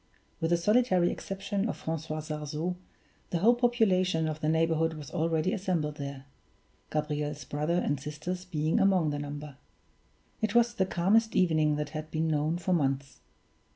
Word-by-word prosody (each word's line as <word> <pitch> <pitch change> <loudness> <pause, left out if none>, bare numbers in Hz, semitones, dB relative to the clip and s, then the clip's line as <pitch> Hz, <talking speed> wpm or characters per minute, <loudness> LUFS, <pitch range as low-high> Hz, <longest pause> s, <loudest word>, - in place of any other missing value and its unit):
With 165 - 0
the 170 - +4
solitary 195 -1 +3
exception 200 +2 -3
of - - -3
Francois 160 -1 -4
Sarzeau, 155 +3 -3 0.5
the 175 - 0
whole 220 +8 +5
population 190 -9 +2
of 155 0 -3
the 155 - +1
neighborhood 160 0 +2
was 150 -3 -9
already 165 +2 +1
assembled 170 -6 -1
there, 140 -1 -6 0.6
Gabriel's 150 -1 -2
brother 150 +4 -1
and 145 -5 0
sisters 155 +6 -5
being 160 -3 0
among 185 -6 +3
the 145 - -3
number. 145 -1 -6 0.8
It 220 0 0
was 235 0 +4
the 190 -6 0
calmest 215 +6 +2
evening 155 -4 +3
that 150 0 -3
had 155 0 -6
been 160 +1 -1
known 155 +2 +1
for 180 +1 0
months. 135 -4 -1
160 Hz, 155 wpm, -29 LUFS, 150-185 Hz, 0.8 s, whole